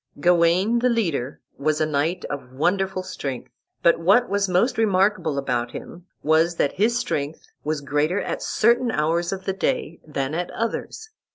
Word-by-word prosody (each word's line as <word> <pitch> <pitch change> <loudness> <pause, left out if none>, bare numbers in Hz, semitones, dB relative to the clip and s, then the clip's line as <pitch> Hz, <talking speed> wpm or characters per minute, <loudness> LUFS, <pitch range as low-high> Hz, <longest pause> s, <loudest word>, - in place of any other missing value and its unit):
Gawain, 175 +7 +3
the 250 +1 +2
leader, 165 - -1 0.2
was 150 +1 +1
a 155 - +2
knight 155 +4 -1
of 135 -3 -6
wonderful 185 +6 0
strength; 135 -9 -6 0.3
but 170 - +5
what 200 +9 +4
was 200 -1 0
most 190 +8 +2
remarkable 195 -7 +2
about 125 -3 -1
him 175 +1 -9 0.2
was 160 +2 +3
that 145 - +1
his 225 +5 +2
strength 150 -11 -3 0.2
was 150 0 -2
greater 150 +6 0
at - - -3
certain 235 +2 +2
hours 170 -1 0
of 190 -1 -5
the 190 - 0
day 170 -3 -2
than 140 -2 -3
at 175 +2 -2
others. 440 - -4
170 Hz, 165 wpm, -23 LUFS, 150-200 Hz, 0.3 s, but